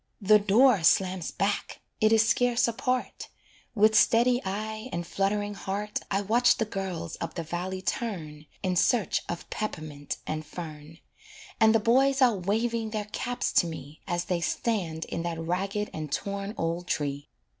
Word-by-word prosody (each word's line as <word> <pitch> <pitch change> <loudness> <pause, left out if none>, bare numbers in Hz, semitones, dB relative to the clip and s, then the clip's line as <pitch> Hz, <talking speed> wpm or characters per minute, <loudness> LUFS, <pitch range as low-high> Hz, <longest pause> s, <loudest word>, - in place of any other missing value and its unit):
The 210 +2 +6
door 210 +1 +5
slams 185 0 +2
back, 200 +1 -2 0.2
it 215 0 +4
is 225 0 +5
scarce 245 +1 +3
apart; 250 +2 -2 0.5
With 215 0 +5
steady 245 +3 +4
eye 215 +4 -4
and 175 0 -3
fluttering 205 +3 -1
heart, 205 +1 -3
I 195 0 +1
watch 235 +5 +3
the 225 - 0
girls 185 -5 -5
up 165 - -4
the 170 - -3
valley 180 +3 -4
turn, 160 - -4 0.2
In 185 -1 0
search 220 +3 +2
of 170 - -5
peppermint 155 -9 -4
and 155 0 -3
fern; 155 -1 -9 0.6
And 220 0 +5
the - - +5
boys 265 +5 +3
are 250 -4 +5
waving 220 +4 -1
their 210 -1 -4
caps 245 +1 -2
to 175 - -5
me, 155 -2 -9
As 175 0 -1
they 175 -2 -1
stand 170 -5 -1
in 170 - -4
that 170 -1 -3
ragged 195 +5 -2
and 155 -2 -5
torn 200 +5 -3
old 170 +2 -2
tree. 145 -2 -2
195 Hz, 160 wpm, -28 LUFS, 170-220 Hz, 0.6 s, The